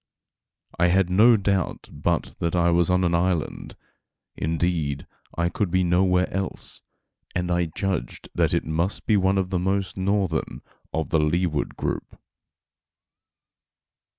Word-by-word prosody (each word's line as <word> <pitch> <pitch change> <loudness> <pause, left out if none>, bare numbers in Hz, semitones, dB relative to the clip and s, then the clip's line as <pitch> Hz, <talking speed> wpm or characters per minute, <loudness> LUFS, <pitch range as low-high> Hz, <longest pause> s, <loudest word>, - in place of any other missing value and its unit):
I 90 - +5
had 90 0 +2
no 110 +5 +6
doubt 95 -2 -1
but 80 +3 -1
that 85 +1 -1
I 85 0 +3
was 85 0 +3
on 90 0 +3
an 85 -1 +1
island, 85 -2 -1 0.6
indeed 80 -3 -1 0.3
I 85 0 +2
could 100 +2 -1
be 90 +1 +2
nowhere 90 +1 +3
else, 95 -1 -4 0.5
and 90 0 -1
I 85 0 +2
judged 90 +2 -3
that - - +2
it - - 0
must 85 +5 -1
be 110 - +3
one 95 0 +2
of 95 -1 -1
the 90 - +1
most 95 +1 -1
northern 95 -3 -1 0.3
of 80 0 -2
the 80 - +2
Leeward 75 0 0
group. - - -4
90 Hz, 140 wpm, -24 LUFS, 85-95 Hz, 0.6 s, no